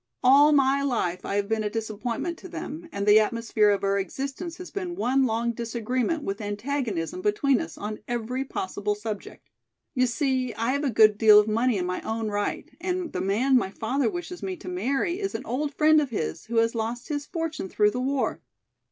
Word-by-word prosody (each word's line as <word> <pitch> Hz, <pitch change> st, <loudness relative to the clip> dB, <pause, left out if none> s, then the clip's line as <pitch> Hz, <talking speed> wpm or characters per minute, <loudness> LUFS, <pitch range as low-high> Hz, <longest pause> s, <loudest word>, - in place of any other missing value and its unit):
All 280 Hz, +4 st, +7 dB
my 275 Hz, -1 st, +4 dB
life 220 Hz, -10 st, -1 dB
I -, -, -2 dB
have 200 Hz, 0 st, 0 dB
been 220 Hz, 0 st, 0 dB
a 210 Hz, -, -1 dB
disappointment 225 Hz, +9 st, -3 dB
to -, -, -10 dB
them 325 Hz, +2 st, -7 dB
and 200 Hz, 0 st, -3 dB
the 210 Hz, +1 st, +7 dB
atmosphere 220 Hz, -1 st, +2 dB
of 200 Hz, -1 st, +1 dB
our 200 Hz, 0 st, +2 dB
existence 275 Hz, -, -5 dB
has 365 Hz, -, -9 dB
been 365 Hz, -3 st, -4 dB
one 265 Hz, -6 st, +2 dB
long 230 Hz, +1 st, 0 dB
disagreement 235 Hz, +6 st, -2 dB
with 200 Hz, -3 st, -3 dB
antagonism 205 Hz, -, -3 dB
between 235 Hz, +7 st, +2 dB
us 325 Hz, -, -7 dB
on 210 Hz, +1 st, -5 dB
every 240 Hz, +2 st, -2 dB
possible 205 Hz, -4 st, -3 dB
subject. 210 Hz, -1 st, -7 dB, 0.5 s
You 255 Hz, -2 st, +2 dB
see 255 Hz, -1 st, 0 dB
I 230 Hz, +3 st, 0 dB
have 280 Hz, +2 st, -1 dB
a 280 Hz, -, +1 dB
good 215 Hz, -2 st, +5 dB
deal 215 Hz, -2 st, +8 dB
of 210 Hz, -, +2 dB
money 230 Hz, +1 st, +2 dB
in 180 Hz, -, -1 dB
my 180 Hz, 0 st, -3 dB
own 220 Hz, -1 st, -2 dB
right 205 Hz, 0 st, -2 dB
and 360 Hz, -2 st, -2 dB
the 180 Hz, -, -2 dB
man 220 Hz, +8 st, +2 dB
my 215 Hz, -, 0 dB
father 230 Hz, +5 st, -1 dB
wishes 350 Hz, 0 st, -6 dB
me 375 Hz, -1 st, -4 dB
to 205 Hz, -, -12 dB
marry 270 Hz, -, -1 dB
is 390 Hz, -1 st, -3 dB
an -, -, -5 dB
old 285 Hz, +5 st, -2 dB
friend 310 Hz, 0 st, +5 dB
of 285 Hz, -, -2 dB
his, 80 Hz, -, -3 dB
who 235 Hz, -, -5 dB
has 230 Hz, 0 st, +3 dB
lost 235 Hz, +4 st, -3 dB
his 290 Hz, -1 st, -3 dB
fortune 325 Hz, -, -4 dB
through 210 Hz, +2 st, +3 dB
the 250 Hz, -, -3 dB
war. 265 Hz, -3 st, -1 dB
235 Hz, 205 wpm, -26 LUFS, 210-280 Hz, 0.5 s, deal